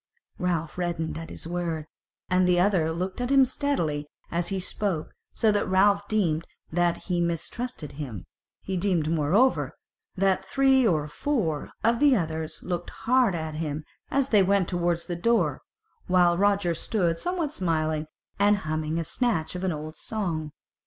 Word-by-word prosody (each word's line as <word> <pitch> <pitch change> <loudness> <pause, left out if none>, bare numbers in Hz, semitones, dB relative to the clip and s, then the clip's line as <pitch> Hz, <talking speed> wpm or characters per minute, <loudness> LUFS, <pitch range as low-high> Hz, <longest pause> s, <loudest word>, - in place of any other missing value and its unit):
Ralph 170 -2 -1
reddened 170 -2 -2
at 165 0 -8
his - - -7
word, 170 -2 -2 0.4
and 185 0 +3
the 180 -1 +4
other 180 -4 +3
looked 185 +6 -3
at 245 - -1
him 270 -1 +6
steadily 170 - -1 0.2
as 170 0 -1
he 195 -1 -1
spoke, 185 -3 -2 0.2
so 220 - +2
that 205 -2 0
Ralph 200 +2 +4
deemed 170 -7 0 0.2
that 175 0 +1
he 175 -2 0
mistrusted 170 - -3
him: 135 - -7 0.4
he 190 -1 -2
deemed 175 -4 +1
moreover 170 - +2 0.4
that 190 0 +2
three 265 +4 +4
or 155 -5 +1
four 165 - -1
of 230 +1 +3
the 290 -3 +6
others 160 -4 -3
looked 175 -1 -3
hard 245 -5 +2
at 160 -1 -4
him 155 -1 -3 0.3
as 275 -1 +1
they 210 -3 +5
went 195 -1 +3
towards 175 -1 0
the 175 - -3
door, 175 - +1 0.5
while 180 -1 +4
Roger 200 -2 +2
stood 170 -1 0
somewhat 345 -5 -2
smiling, 155 -3 0 0.3
and 205 +1 +5
humming 155 +1 -1
a - - -1
snatch 165 -3 -1
of 180 +1 -5
an 190 - +1
old 155 0 -6
song. 165 -7 -3
175 Hz, 160 wpm, -26 LUFS, 160-205 Hz, 0.5 s, him